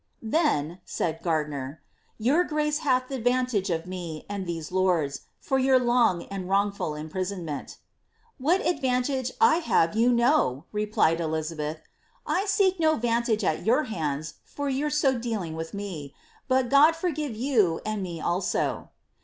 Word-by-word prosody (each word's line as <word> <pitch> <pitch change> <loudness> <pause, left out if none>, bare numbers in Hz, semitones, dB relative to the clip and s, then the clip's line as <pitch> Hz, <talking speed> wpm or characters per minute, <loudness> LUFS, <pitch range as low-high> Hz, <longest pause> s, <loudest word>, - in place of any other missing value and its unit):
^ - - -47 0.3
Then," 180 - +1
said 165 -1 -3
Gardiner, 150 -4 -2
^ - - -40
your 285 +11 +2
^race 300 0 0
hath 255 -4 +1
the 270 -1 -4
vantage 245 -4 +1
of 165 -1 -1
me 175 -4 -6
and 200 -2 -4
these 165 -2 -5
lords, 175 -7 +1 0.2
for 265 - 0
your 260 0 +5
long 240 -8 +2
and 190 -2 -6
wrongful 200 -4 0
unprisonmenL" 180 +4 -4 0.2
^^ - - -12 0.6
What 330 +9 +2
advantage 260 -4 0
I 450 -8 +5
have 205 - +2
you 235 +3 +4
know 235 - +2
!" - - -42
' - - -41
replied 210 -6 +1
Elizabeth; 155 -1 -3
^ - - -28 0.4
I 385 - 0
seek 385 -2 +2
no 315 -1 +3
vantage 235 -2 0
at 160 -4 0
your 250 +7 +3
hands 155 - -3
for 285 -1 -4
your 275 +3 0
so 280 -4 +2
dealing 215 -9 -3
with 160 0 -5
me 180 -9 -6 0.2
— - - -32
but 260 -2 +2
God 295 +4 +6
foigive 310 -7 -2
you 215 -9 +2
and 215 -1 -2
me 175 -3 -5
also." 175 +4 -1
215 Hz, 170 wpm, -26 LUFS, 165-265 Hz, 0.6 s, God